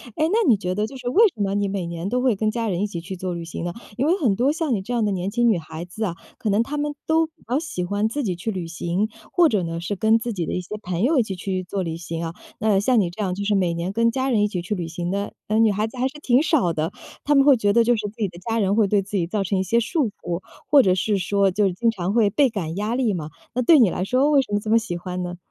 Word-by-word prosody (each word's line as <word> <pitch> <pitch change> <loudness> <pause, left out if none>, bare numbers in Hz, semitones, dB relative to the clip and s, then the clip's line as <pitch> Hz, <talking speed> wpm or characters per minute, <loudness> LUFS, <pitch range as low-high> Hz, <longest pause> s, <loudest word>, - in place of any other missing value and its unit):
哎， 310 - +2
那 445 0 +2
你 225 -5 +5
觉 180 -1 -3
得 210 +2 0
就 230 - -9
是 250 -2 -4
为 420 - +6
什 215 - -5
么 195 0 0
你 205 0 +1
每 195 -3 -3
年 170 +2 -4
都 250 +3 0
会 255 -4 +2
跟 215 +2 0
家 230 0 -2
人 185 -3 -1
一 - - 0
起 170 -4 -6
去 190 +3 -6
做 185 0 -4
旅 170 -1 -5
行 165 - -6
呢？ 175 - -3 0.2
因 265 - +1
为 335 +4 +3
很 240 - +2
多 250 +7 +2
像 310 -5 0
你 195 - -2
这 245 - -4
样 235 -2 +1
的 210 - +1
年 190 0 -2
轻 240 +1 +3
女 210 - +3
孩 160 +1 -7
子 195 +5 -6
啊， 170 - -3 0.2
可 215 - -1
能 205 +3 +3
她 285 +5 -3
们 295 0 -1
都 320 +1 +3
比 320 - -17 0.2
较 255 - +2
喜 310 - -4
欢 205 +4 0
自 285 +6 -3
己 185 -6 -1
去 200 +6 -3
旅 185 -4 -4
行， 175 +5 -2 0.2
或 340 -3 +5
者 200 -4 +1
呢 165 0 -3
是 190 +4 -3
跟 220 +3 +3
自 235 +1 -3
己 175 -4 -2
的 - - -4
一 180 - -1
些 180 - -14 0.2
朋 175 -1 -2
友 280 +7 +3
一 250 - +4
起 205 - -5
去 185 0 -3
做 195 +2 -3
旅 165 -2 -3
行 165 0 -5
啊， 165 - -5 0.3
呃， 210 -2 +3
像 235 +3 +3
你 180 - 0
这 190 +5 -5
样 185 -2 -1
就 200 +2 -4
是 205 0 +1
每 180 -3 +1
年 170 +3 -3
跟 230 +2 +2
家 260 +2 -1
人 220 -5 +3
一 - - +3
起 185 -4 -3
去 195 +5 -3
旅 175 -3 -4
行 175 +1 -4
的， 200 +2 -2
嗯， 220 +2 +3
女 220 - +4
孩 210 +2 0
子 225 - -11
还 255 +1 +1
是 295 +3 -9
挺 255 0 +3
少 290 - +2
的， 160 +3 -2 0.3
她 295 - +2
们 275 -1 +6
会 275 -2 +6
觉 205 -2 +2
得 235 +1 +5
就 240 +1 +3
是 215 -2 -3
自 205 - -16
己 215 -3 0
的 175 - -12
家 225 0 +1
人 200 -1 +2
会 220 - +4
对 200 0 +2
自 200 +2 -7
己 170 -3 0
造 205 +1 -1
成 195 +1 0
一 190 - +1
些 230 +6 +2
束 275 +4 0
缚， 175 +1 -3 0.3
或 285 -1 +7
者 185 - +3
是 200 +2 0
说 195 +1 +2
就 200 +1 +2
经 230 +6 +1
常 190 -1 -3
会 225 -3 +4
倍 265 +6 +3
感 175 -8 -4
压 210 +4 -1
力 245 -5 +1
嘛。 155 -4 -4 0.3
那 250 - +1
对 300 +5 +6
你 230 -6 +6
来 180 - -2
说 255 +8 +2
为 285 -2 +5
什 255 - -9
么 205 - +2
这 215 - -6
么 225 - +5
喜 220 -6 -2
欢 180 +1 -5
呢？ 175 0 -5
205 Hz, 350 characters per minute, -23 LUFS, 180-240 Hz, 0.3 s, 或